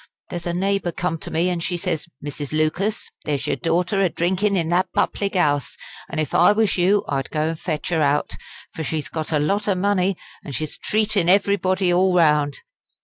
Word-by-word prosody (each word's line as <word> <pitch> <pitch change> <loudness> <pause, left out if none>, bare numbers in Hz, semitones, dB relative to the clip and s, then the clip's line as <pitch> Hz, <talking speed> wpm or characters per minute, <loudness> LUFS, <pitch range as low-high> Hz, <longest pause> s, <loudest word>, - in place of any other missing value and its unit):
There's 175 0 -4
a 170 - -1
neighbour 195 -1 0
come 165 -1 -2
to - - -6
me, 165 +3 +1
an' 175 -1 -1
she 175 +1 -2
says: 170 -3 -2 0.2
'Mrs. 145 -1 -5
Lucas, 155 +7 -1
there's 145 -3 -2
your - - 0
daughter 180 - 0
a 190 - +3
drinkin' 190 +5 0
in 165 -2 0
that 175 +2 +1
public 200 -1 0
'ouse, 145 -6 +1 0.3
an' - - -5
if 155 -3 -2
I 175 - +6
was 215 -1 +2
you 195 +3 +2
I'd 135 -2 -2
go 155 0 0
and 165 -1 -5
fetch 155 -4 -3
her 165 -3 +1
out; 145 0 +1 0.4
for 160 - -4
she's 155 0 -3
got 160 -1 -4
a 155 - +2
lot 195 +9 0
o' 200 - +2
money, 190 -1 +1 0.3
an' 140 - -7
she's 155 +3 -3
treatin' 210 -4 +1
everybody 190 -2 +2
all 185 +1 +3
round.' 150 -4 +3
175 Hz, 200 wpm, -22 LUFS, 155-195 Hz, 0.4 s, I